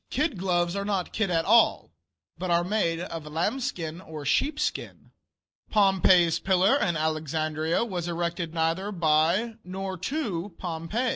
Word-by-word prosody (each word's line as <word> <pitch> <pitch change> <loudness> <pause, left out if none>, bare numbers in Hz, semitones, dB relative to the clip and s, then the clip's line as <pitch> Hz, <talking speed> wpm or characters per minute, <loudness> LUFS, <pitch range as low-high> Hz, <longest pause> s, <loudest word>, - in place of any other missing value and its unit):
Kid 295 0 0
gloves 175 -1 0
are 200 - -2
not 200 -3 -2
kid 215 -3 0
at 165 -2 +1
all, 230 +2 +4 0.4
but 185 - -4
are 170 0 +3
made 175 -4 0
of 165 -3 -6
lambskin 170 - -2
or 155 -5 -8
sheepskin. 285 - -1 0.6
Pompey's 190 -4 +4
Pillar, 190 +5 +3
in 175 -8 0
Alexandria, 155 - -1
was 180 -6 -4
erected 170 -1 -2
neither 165 +5 -1
by 170 +6 +2
nor 190 +1 -5
to 195 - -3
Pompey. 180 +8 -2
175 Hz, 135 wpm, -26 LUFS, 165-200 Hz, 0.6 s, all